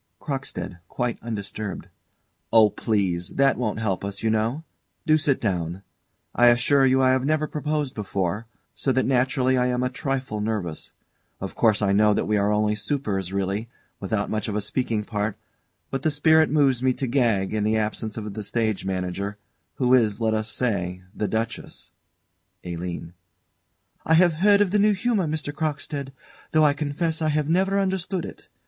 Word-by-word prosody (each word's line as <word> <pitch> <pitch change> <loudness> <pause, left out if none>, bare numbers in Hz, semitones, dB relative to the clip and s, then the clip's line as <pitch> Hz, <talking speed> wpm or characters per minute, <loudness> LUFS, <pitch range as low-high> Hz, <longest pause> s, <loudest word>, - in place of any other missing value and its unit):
CROCKSTEAD. 135 - -5
[Quite 120 +2 -2
undisturbed.] 105 -2 -5 0.6
Oh, 110 -2 +6
please! 95 -6 -1
That 135 0 +4
won't 110 -4 -2
help 100 -4 -1
us, 100 +1 -5
you 110 - +2
know. 115 +8 0 0.4
Do 155 - +5
sit 145 -3 +2
down. 90 -3 -2 0.5
I 120 - +5
assure 130 +3 +4
you 130 0 +3
I 130 - +5
have 130 0 +2
never 155 +2 +1
proposed 150 -2 -2
before, 100 +1 -2 0.3
so 135 - -1
that 130 - +2
naturally 130 0 +2
I 125 - +2
am 125 0 0
a 125 - -1
trifle 130 -5 -3
nervous. 105 -7 -3 0.5
Of 95 - -5
course 110 -3 +2
I 100 -1 +2
know 105 +1 +4
that - - 0
we 105 - +1
are 100 0 +2
only 105 0 +2
supers 105 - -2
really, 100 +3 -2 0.3
without 100 +1 -2
much 110 0 -2
of 105 - -3
a 105 - 0
speaking 115 -1 -1
part; 105 -1 -2 0.5
but 135 - -2
the 155 - +2
spirit 160 +1 +4
moves 140 -5 +3
me 130 0 +3
to 135 - -3
gag, 115 -7 +1
in 105 -1 0
the 110 +1 +2
absence 110 0 -3
of 105 -2 -5
the 110 - -5
stage 110 0 -1
manager, 95 +2 -3 0.4
who 125 -1 +2
is, 110 -5 +3
let 110 -1 +1
us 110 0 -1
say, 95 -7 -2
the 105 - -2
Duchess 110 +2 -4 0.7
ALINE. 85 -1 -5 0.9
I 160 - +3
have 175 0 +5
heard 205 0 +6
of 195 -3 +2
the 210 - +3
New 210 +1 +4
Humour, 205 -3 0
Mr. 150 -1 -3
Crockstead, 145 -2 -3 0.4
though 155 -1 +5
I 145 - +4
confess 155 +3 -2
I 155 - +2
have 150 -1 0
never 190 +4 +2
understood 190 -2 -1
it. - - -11
115 Hz, 180 wpm, -24 LUFS, 105-145 Hz, 0.9 s, Oh